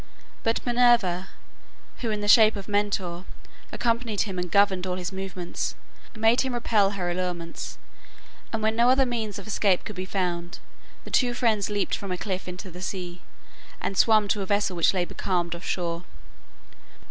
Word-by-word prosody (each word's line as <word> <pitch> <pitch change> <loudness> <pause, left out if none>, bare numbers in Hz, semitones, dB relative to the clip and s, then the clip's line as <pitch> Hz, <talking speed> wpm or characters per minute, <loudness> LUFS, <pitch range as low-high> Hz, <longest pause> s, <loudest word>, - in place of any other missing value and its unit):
But 225 0 0
Minerva, 235 -7 +3 0.7
who 235 - -3
in 210 -1 -1
the 205 - -2
shape 220 +1 +7
of 200 -2 -7
Mentor 200 -4 -1 0.5
accompanied 230 -3 0
him 190 -4 -2
and 180 0 -3
governed 190 -1 +3
all 180 - -1
his 180 0 -4
movements, 190 -2 -4 0.4
made 225 +2 +4
him 260 -2 -2
repel 205 -4 +2
her 175 -2 -1
allurements, 175 -2 -4 0.7
and 225 -1 -2
when 220 +1 +2
no 235 +2 +4
other 265 +1 +5
means 225 -4 -3
of 200 - -8
escape 200 -3 +1
could 210 - -6
be 185 0 -4
found, 175 -2 -2 0.5
the - - -11
two 245 -2 +2
friends 220 -5 +1
leaped 205 -1 0
from 200 -2 -6
a 180 - -1
cliff 185 -1 -4
into 180 +1 -7
the 180 +2 -9
sea, 180 -2 -5 0.6
and 195 - -3
swam 215 +1 +5
to 205 - +1
a 195 - -4
vessel 205 -2 +1
which 170 - +4
lay 180 -1 +1
becalmed 175 -2 -2
off 170 +1 -8
shore. 170 -1 -2
195 Hz, 175 wpm, -26 LUFS, 180-220 Hz, 0.7 s, shape